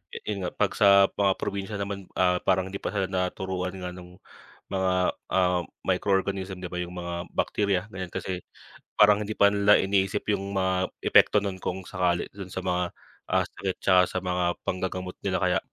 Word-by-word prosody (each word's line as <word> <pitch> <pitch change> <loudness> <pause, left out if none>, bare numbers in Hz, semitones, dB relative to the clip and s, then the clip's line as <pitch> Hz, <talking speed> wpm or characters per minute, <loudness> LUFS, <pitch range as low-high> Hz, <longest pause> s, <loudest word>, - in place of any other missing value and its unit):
yu - - -4
yun 100 - -2
nga 90 - -1
'pag - - +1
sa 100 -1 +7
mga 100 -1 +3
probinsya 100 +1 -3
naman, 100 -1 -4
ah, 90 -1 +3
parang 95 -1 +2
hindi 100 - -5
pa - - -4
sila 100 -1 0
naturuan 90 0 -2
nga 90 -1 -5
nung 90 0 -12 0.6
mga, 95 -1 +1 0.4
ah, 90 -1 +3 0.3
microorganism, 95 0 0
di - - -2
ba, 90 - -3
yung 90 0 -5
mga 85 0 -5
bakterya, 100 -3 +1
ganiyan. 95 -3 -6
Kasi 90 -1 -3 0.6
parang 105 0 +6
hindi 110 - -4
pa 100 - +6
nila 100 0 +4
iniisip 95 +1 0
yung 100 0 -2
mga 95 -1 0
epekto 105 - +5
nun 100 -2 -3
kung 95 +1 -3
sakali 90 -2 0
dun 95 -2 -9
sa 95 - -3
mga, 90 -1 -1 0.4
ah, - - +3
sakit 95 -2 -4
tsaka 95 -1 +5
sa 95 - -3
mga 90 -1 -1 0.2
panggagamot 90 0 -3
nila - - +1
kaya, - - +2
95 Hz, 185 wpm, -27 LUFS, 90-100 Hz, 0.6 s, sa